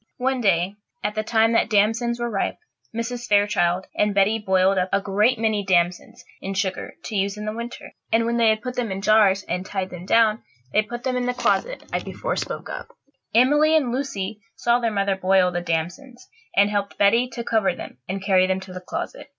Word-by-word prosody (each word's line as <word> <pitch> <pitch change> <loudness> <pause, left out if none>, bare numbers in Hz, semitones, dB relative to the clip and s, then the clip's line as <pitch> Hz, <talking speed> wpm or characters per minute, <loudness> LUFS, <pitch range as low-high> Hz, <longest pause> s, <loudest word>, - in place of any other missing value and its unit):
One 260 0 0
day, 195 -1 +1 0.3
at 210 - -1
the 215 - -1
time 225 +1 +2
that 230 - +2
damsons 225 +3 +2
were 240 - -1
ripe, 195 - -1 0.3
Mrs. 235 +1 -4
Fairchild 200 -3 +2
and 210 -1 +1
Betty 205 +3 +3
boiled 190 -1 +2
up 185 +1 -1
a 200 - +3
great 210 +5 +2
many 220 -2 0
damsons 175 -2 0 0.2
in 195 +1 -4
sugar, 190 -1 -2
to 220 - -6
use 200 +1 0
in 210 - -6
the 215 - -3
winter; 235 +1 -7 0.2
and 230 0 +3
when 235 +1 0
they 230 -1 +4
had 215 0 0
put 250 -1 -4
them 235 -4 -2
in 195 +1 -4
jars 200 -2 +4
and 180 +1 -3
tied 190 -1 -4
them 180 +1 -9
down, 225 -1 +3 0.3
they 215 - +5
put 240 +3 -7
them 260 -1 -1
in 245 0 -1
the 250 - -1
closet - - 0
I - - +1
before - - -4
spoke - - -4
of. - - -6 0.5
Emily 295 +6 +5
and 265 -6 0
Lucy 215 -6 -3
saw 240 0 +2
their 235 -1 0
mother 200 -2 0
boil 185 -1 +3
the 175 0 -2
damsons, 175 - -4 0.3
and 200 +1 +4
helped 200 -1 -2
Betty 230 +5 +4
to 235 - -4
cover 215 -6 +1
them - - -9
and 190 0 -3
carry 185 -2 +4
them 190 0 0
to 190 -1 -10
the 185 - -7
closet. 335 - -6
210 Hz, 215 wpm, -23 LUFS, 190-235 Hz, 0.5 s, they